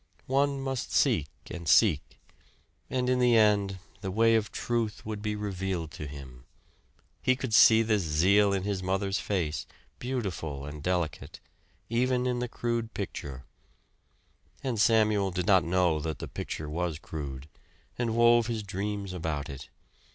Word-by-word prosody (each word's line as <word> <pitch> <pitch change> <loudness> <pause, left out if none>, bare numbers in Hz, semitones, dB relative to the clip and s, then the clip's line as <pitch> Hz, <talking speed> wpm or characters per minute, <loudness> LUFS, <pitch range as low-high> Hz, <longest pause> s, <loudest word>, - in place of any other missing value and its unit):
One 140 +1 +1
must 135 -2 -3
seek 75 - +2 0.2
and 85 -3 -5
seek; 90 -10 +3 0.7
and 125 -1 -1
in 125 0 +2
the 120 -2 +5
end 100 -3 +3 0.2
the 95 - -3
way 115 +4 +3
of 110 -2 +1
truth 115 -3 -2
would 105 -1 -4
be 105 0 -2
revealed 95 -5 -3
to 75 - -7
him. 65 -4 -10 0.8
He 130 - +3
could 130 -3 -4
see 110 +1 +7
this 110 -2 +1
zeal 95 +6 +3
in 95 -1 0
his 100 -1 -2
mother's 95 +1 -1
face, 85 -7 -2 0.3
beautiful 95 - -4
and 75 +1 -8
delicate, 85 -2 -2 0.5
even 125 +2 +1
in 125 -1 0
the 125 0 -3
crude 115 -1 -3
picture; 70 -9 -6 1.2
and 120 -5 0
Samuel 110 -3 +3
did 90 -1 -2
not 95 -1 +5
know 85 -2 +2
that 80 -1 -3
the - - -6
picture 75 - -5
was 85 +1 -2
crude, 70 -4 -7 0.5
and 115 -2 -1
wove 120 -1 +5
his 115 -3 -2
dreams 100 0 -4
about 80 -5 -3
it. 70 0 -8
100 Hz, 150 wpm, -29 LUFS, 80-115 Hz, 1.2 s, see